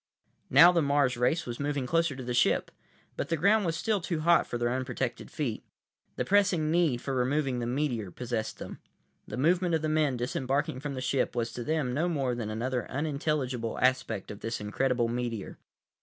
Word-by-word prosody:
Now 165 +7 +8
the 170 -2 +2
Mars 140 -3 +2
race 125 +8 +1
was 120 -1 -6
moving 145 -2 -1
closer 165 0 +1
to 130 - -7
the 125 0 -3
ship, 120 - +2 0.4
but - - -3
the 165 - +1
ground 200 +4 +3
was 165 -1 -1
still 215 -4 0
too 170 -2 -2
hot 170 +1 +4
for 120 - -3
their 120 0 0
unprotected 130 -1 -3
feet. 125 -8 -3 0.5
The - - -2
pressing 185 -6 +3
need 160 -8 +2
for 135 - -3
removing 130 0 0
the 120 - -2
meteor 120 -6 -1
possessed 115 +2 -4
them. - - -8 0.5
The - - -6
movement 175 +4 +2
of 160 - -2
the 155 - 0
men 155 -4 +1
disembarking 130 +2 -1
from 145 0 -5
the 130 - -4
ship 130 0 0
was 115 -1 -2
to 120 - -5
them 150 -3 -1
no 160 +6 +1
more 135 -6 0
than 115 -3 -4
another 120 +2 -2
unintelligible 140 -4 -2
aspect 125 -5 0
of 100 - -9
this 115 +1 -3
incredible 120 +3 0
meteor. 120 -3 -4
130 Hz, 195 wpm, -29 LUFS, 120-155 Hz, 0.5 s, Now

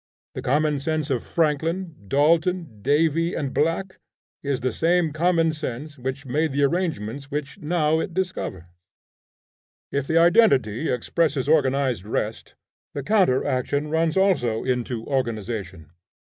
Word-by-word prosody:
The - - -5
common 150 +2 +1
sense 155 0 -2
of 125 -3 0
Franklin, 165 +3 -1
Dalton, 160 - +1
Davy 160 - +2
and 140 -3 -3
Black, 170 +5 -1 0.4
is 140 -3 -2
the 130 +1 0
same 165 -2 +1
common 165 0 +2
sense 150 -1 -6
which 130 +2 -4
made 150 +3 0
the 140 +1 +1
arrangements 140 - -1
which 145 -1 -5
now 155 0 +1
it 170 - -3
discovers. 180 - -3 1.3
If 140 -1 -1
the 160 - +2
identity 165 - +4
expresses 140 +3 0
organized 135 - +2
rest, 110 +1 -4 0.4
the 140 - -3
counter 185 -8 +3
action 140 +4 -1
runs 160 +1 +1
also 170 - +2
into 125 -2 -2
organization. 105 - -3
145 Hz, 130 wpm, -24 LUFS, 130-165 Hz, 1.3 s, identity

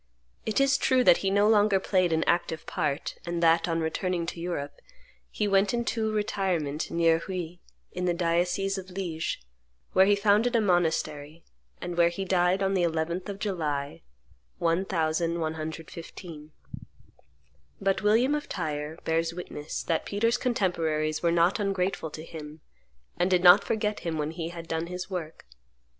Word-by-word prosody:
It 220 - +1
is 275 0 +3
true 255 -1 +3
that 170 - +7
he 195 - -1
no 200 +2 +3
longer 210 -2 +4
played 185 -2 +1
an 160 0 +2
active 170 -2 0
part, 150 -5 -2
and 170 0 -3
that, 165 +1 +4
on 165 0 0
returning 170 +2 -1
to 170 - -5
Europe, 155 -5 -4 0.5
he 210 - -1
went 195 +2 +3
into 230 -2 -1
retirement 185 -8 -1
near 165 -1 +3
Huy, 175 -1 -5 0.3
in 180 0 -3
the 175 - +2
diocese 180 +3 0
of 190 0 -10
Lige, 175 -3 -3 0.5
where 190 +1 +6
he 205 - +5
founded 210 +4 +3
a - - +5
monastery, 160 -5 0 0.4
and 175 -1 -5
where 170 0 +5
he 190 +3 -4
died 185 +1 +2
on 195 0 +1
the 190 - +2
11th 170 +3 -1
of 200 - -5
July, 150 -9 -3 0.6
1115. 165 -1 -2 1.3
But 195 -1 +1
William 225 +7 +3
of 295 0 -3
Tyre 155 -2 -3
bears 165 +1 0
witness 155 -4 -6
that 165 -2 -1
Peter's 230 +4 +1
contemporaries 165 -9 0
were 170 - +2
not 170 +4 +3
ungrateful 195 -4 -1
to 155 +1 -8
him, 155 -1 -9 0.6
and 180 - +2
did 180 -1 +2
not 180 +3 +8
forget 210 -1 -1
him 165 -2 -3
when 150 0 -2
he 165 0 -5
had 170 -1 -8
done 165 +1 -2
his 180 +2 -6
work. 165 -4 -6
175 Hz, 155 wpm, -27 LUFS, 160-195 Hz, 1.3 s, not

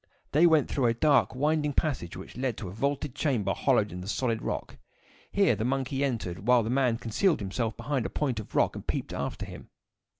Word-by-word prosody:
They 160 +4 +6
went 160 -3 +4
through 130 -4 +1
a 115 - +2
dark, 140 0 +3
winding 150 +2 +1
passage, 130 - -1
which 95 - -10
led 125 -3 -2
to 105 - -5
a - - -6
vaulted 140 +5 -2
chamber 130 -8 0
hollowed - - +2
in 90 +1 -6
the 90 - -8
solid 115 0 -1
rock. - - -4 0.5
Here 195 - +3
the 105 - -3
monkey 135 +2 -1
entered, 105 -7 -3
while 125 -2 +5
the 110 - -2
man 125 -3 +2
concealed 145 - +1
himself 110 +3 -2
behind 130 +1 -1
a - - -10
point 130 -7 -1
of 110 - -9
rock - - +3
and - - -8
peeped - - -2
after - - -3
him. - - -11
125 Hz, 210 wpm, -28 LUFS, 110-145 Hz, 0.5 s, They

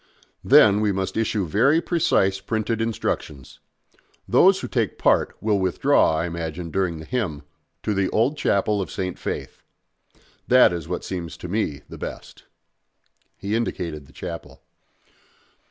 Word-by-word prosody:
Then 105 0 +6
we 105 -1 +2
must 95 0 -3
issue 110 -3 0
very 125 - +3
precise 100 - +1
printed 110 +3 -2
instructions. 75 - -3 0.7
Those - - +5
who - - -4
take - - -1
part - - +2
will 105 -2 +1
withdraw, 90 -3 +2
I 80 - -1
imagine, 85 0 -5
during 90 -2 -1
the 80 - -9
hymn, 90 - -3 0.4
to 105 - 0
the 100 -1 0
old 120 +7 +1
chapel 100 -5 +1
of 95 - -4
St. 95 -1 -4
Faith. - - -5 0.9
That 125 -7 +6
is 85 -2 -5
what 90 - -4
seems 85 -3 -5
to - - -7
me 90 -7 -2
the - - -11
best." - - -8 0.9
He 100 +2 -4
indicated 85 -10 -3
the - - -18
chapel. 85 -1 -8
95 Hz, 145 wpm, -23 LUFS, 85-110 Hz, 0.9 s, Then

